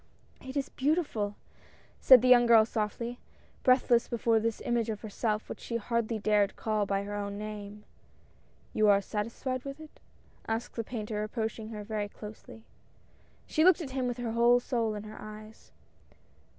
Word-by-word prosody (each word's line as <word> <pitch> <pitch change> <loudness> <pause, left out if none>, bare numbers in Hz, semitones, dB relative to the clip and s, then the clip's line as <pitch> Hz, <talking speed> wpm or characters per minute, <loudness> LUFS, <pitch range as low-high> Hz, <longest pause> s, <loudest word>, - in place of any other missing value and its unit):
" - - -33
It 265 - -4
is 275 0 -1
beautiful! 260 -9 -1 0.3
" - - -29
said 255 -3 +8
the - - +3
young 245 -1 +7
girl 225 -2 +7
softly, 230 +2 -3 0.4
breath 255 0 +3
less 235 -1 +4
before 230 -1 +2
this 225 0 -2
image 235 -2 0
of 215 -2 -4
herself 215 0 -2
which - - -7
she 230 - -3
hardly 235 0 -1
dared 210 -1 +2
call 215 -2 -1
by 195 0 0
her 205 +1 -6
own 200 0 -4
name. 210 0 -7 0.9
"You 215 - +3
are 200 -1 +6
satisfied 230 +5 -4
with 275 +1 -7
it?" 315 -1 -13 0.5
asked 225 +2 -3
the 230 - -2
painter 215 -2 -4
approaching 220 0 -4
her 210 -2 -6
very 210 -1 -3
closely. 215 +1 -11 0.8
She 315 - +1
looked 370 0 +6
at 280 -5 -6
him 260 -1 -1
with 245 0 -3
her 240 -2 -3
whole 235 +1 +5
soul 230 -3 -1
in 210 - -6
her 215 0 -10
eyes. 215 +1 -11
225 Hz, 175 wpm, -30 LUFS, 210-245 Hz, 0.9 s, said